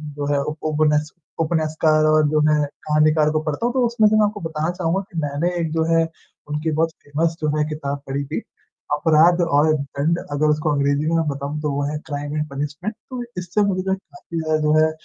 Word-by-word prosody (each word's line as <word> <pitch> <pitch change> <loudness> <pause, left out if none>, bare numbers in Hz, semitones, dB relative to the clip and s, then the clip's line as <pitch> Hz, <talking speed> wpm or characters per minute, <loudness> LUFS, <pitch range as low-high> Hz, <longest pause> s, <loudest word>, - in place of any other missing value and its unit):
जो 145 0 -3
है 140 - +2
ओपोनेस्क 150 0 0 0.3
ओपोनेस्कार 155 -1 +2
और 155 0 +4
जो 155 0 +2
है 150 -1 +3 0.2
कहानीकार 155 0 +3
को 155 - +1
पढ़ता 155 +7 -2
हूँ 245 - 0
तो 255 -2 +2
उसमें 230 -2 +3
से 215 - +2
मैं 215 -1 +5
आपको 205 0 -3
बताना 160 -1 -2
चहूँगा 175 +1 -1
कि 170 - -8
मैंने 145 +4 -1
एक 160 -2 -1
जो 160 0 +1
है 165 - +4 0.5
उनकी 150 +2 -1
बहुत 160 +2 +1
फ़ेमस 160 +3 -1
जो 155 - +1
है 150 - +2
किताब 145 -2 -3
पढ़ी 140 +1 -2
थी, 150 +3 -3 0.5
अपराध 160 +3 +4
और 155 -2 +3
दंड 145 +3 -1
अगर 145 +1 +1
उसको 150 +1 +1
अंग्रेज़ी 140 +1 +1
में 165 - +1
मैं 165 -1 +1
बताऊँ 140 +1 -3
तो 150 -1 -1
वो 140 +1 -1
है 150 - -3
क्राइम 145 0 -4
एंड 150 0 -1
पनिशमेंट, 150 +9 -4
तो 255 -2 -4
इससे 180 +3 -1
मुझे 185 -2 0
काफ़ी 190 - -7
ज़्यादा 155 0 +1
जो 150 0 +2
है 155 0 +4
155 Hz, 210 wpm, -21 LUFS, 150-165 Hz, 0.5 s, मैं